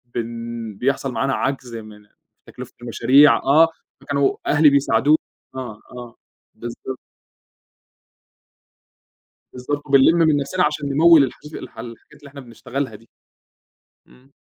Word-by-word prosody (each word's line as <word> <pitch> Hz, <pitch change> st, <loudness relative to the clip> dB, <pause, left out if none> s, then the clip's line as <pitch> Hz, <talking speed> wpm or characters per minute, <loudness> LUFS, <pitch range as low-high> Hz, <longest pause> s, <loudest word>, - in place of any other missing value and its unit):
بن 115 Hz, -2 st, -6 dB
بيحصل 135 Hz, +2 st, -1 dB
معانا 135 Hz, +4 st, -1 dB
عجز 130 Hz, -3 st, -3 dB
من 105 Hz, -2 st, -11 dB, 0.4 s
تكلفة 125 Hz, 0 st, -11 dB
المشاريع 130 Hz, +5 st, +4 dB
آه، 155 Hz, +4 st, +4 dB, 0.3 s
فكانوا 140 Hz, -1 st, 0 dB
أهلي 150 Hz, 0 st, +5 dB
بيساعدوا 140 Hz, +1 st, +2 dB, 0.4 s
آه، 120 Hz, -5 st, -7 dB
آه، 120 Hz, -1 st, -10 dB, 0.4 s
بالضبط. 120 Hz, +2 st, -8 dB, 2.5 s
بالضبط، 145 Hz, +4 st, -5 dB
وبنلم 140 Hz, +4 st, +5 dB
من 160 Hz, -3 st, +3 dB
نفسنا 180 Hz, +6 st, -1 dB
علشان 150 Hz, -2 st, -2 dB
نموّل 155 Hz, +1 st, +6 dB
الحج 150 Hz, +4 st, -7 dB
الح -, -, -10 dB
الحاجات 115 Hz, +3 st, -12 dB
اللي 145 Hz, -1 st, -14 dB
إحنا 140 Hz, 0 st, -11 dB
بنشتغلها 125 Hz, 0 st, -6 dB
دي. 115 Hz, +2 st, -16 dB, 1.0 s
إمم. 130 Hz, +2 st, -23 dB
135 Hz, 115 wpm, -20 LUFS, 120-145 Hz, 2.5 s, نموّل